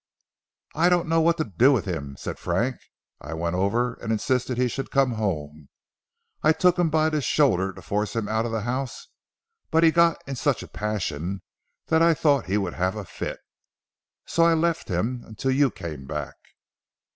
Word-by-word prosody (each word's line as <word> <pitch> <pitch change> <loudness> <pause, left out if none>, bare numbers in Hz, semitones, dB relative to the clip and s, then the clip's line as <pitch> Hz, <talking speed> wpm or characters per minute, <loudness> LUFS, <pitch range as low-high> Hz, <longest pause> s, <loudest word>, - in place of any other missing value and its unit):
"I 170 +3 +3
don't 175 -1 +2
know 165 0 +3
what 170 +1 +3
to 160 - +1
do 115 - +3
with 130 -6 +1
him," 75 -7 -4
said - - -6
Frank, - - -1 0.4
"I 75 +3 -6
went 85 +2 -2
over 115 +6 +1
and 110 - -3
insisted 125 +3 0
he 125 0 +2
should 135 +3 -4
come 135 -2 +2
home. 75 - -3 0.7
I 155 - +5
took 180 +1 +3
him 175 -2 +3
by 155 0 +2
the 155 -1 0
shoulder 115 -9 +2
to - - -13
force 105 +2 -2
him 115 -2 -1
out 110 +2 0
of - - -5
the 110 -1 -1
house, 125 +3 -4 0.6
but 160 +1 +3
he 165 - +6
got 170 0 +4
in 140 - -5
such 135 0 0
a - - -10
passion 100 -4 -3 0.5
that 160 0 +4
I 165 -1 +5
thought 145 - +2
he 100 +2 +1
would 95 -4 -2
have 95 +3 -1
a 105 -2 -5
fit. 85 - -6 0.8
So 165 - 0
I 165 0 +5
left 165 0 0
him 115 +7 -2
until 110 +5 -2
you 135 +1 +3
came 75 - -8
back." 75 -3 -4
120 Hz, 190 wpm, -25 LUFS, 95-155 Hz, 0.8 s, he